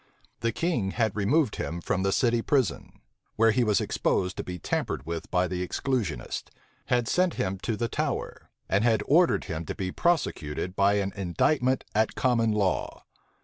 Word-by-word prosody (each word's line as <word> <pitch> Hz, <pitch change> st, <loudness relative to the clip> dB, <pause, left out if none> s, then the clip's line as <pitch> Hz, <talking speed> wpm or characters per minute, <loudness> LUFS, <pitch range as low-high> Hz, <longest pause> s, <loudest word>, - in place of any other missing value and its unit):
The 115 Hz, -, 0 dB
king 120 Hz, -, -1 dB
had 110 Hz, -4 st, +1 dB
removed 115 Hz, +6 st, +2 dB
him 85 Hz, -, -3 dB
from 90 Hz, -, -1 dB
the 95 Hz, 0 st, +1 dB
city 120 Hz, +2 st, +2 dB
prison, 130 Hz, -, -1 dB, 0.3 s
where 115 Hz, +1 st, +4 dB
he 125 Hz, +3 st, +2 dB
was 105 Hz, -4 st, +2 dB
exposed 90 Hz, 0 st, 0 dB
to -, -, -3 dB
be 90 Hz, 0 st, -6 dB
tampered 70 Hz, -4 st, -2 dB
with 85 Hz, 0 st, -5 dB
by 90 Hz, 0 st, +2 dB
the 90 Hz, 0 st, -3 dB
exclusionists; 90 Hz, -, -2 dB, 0.4 s
had 120 Hz, -2 st, +1 dB
sent 180 Hz, -1 st, +2 dB
him 95 Hz, 0 st, -2 dB
to 110 Hz, +1 st, -2 dB
the 115 Hz, -, 0 dB
Tower; -, -, -3 dB, 0.2 s
and 100 Hz, +2 st, +2 dB
had 115 Hz, -2 st, +3 dB
ordered 170 Hz, +4 st, +4 dB
him 80 Hz, +1 st, -4 dB
to -, -, -5 dB
be 95 Hz, -2 st, -3 dB
prosecuted 90 Hz, -, -1 dB
by 100 Hz, 0 st, +3 dB
an 100 Hz, -1 st, -1 dB
indictment 125 Hz, -, +1 dB
at 110 Hz, +1 st, +1 dB
common 115 Hz, -3 st, +2 dB
law. 100 Hz, -3 st, -1 dB
105 Hz, 175 wpm, -27 LUFS, 90-120 Hz, 0.4 s, where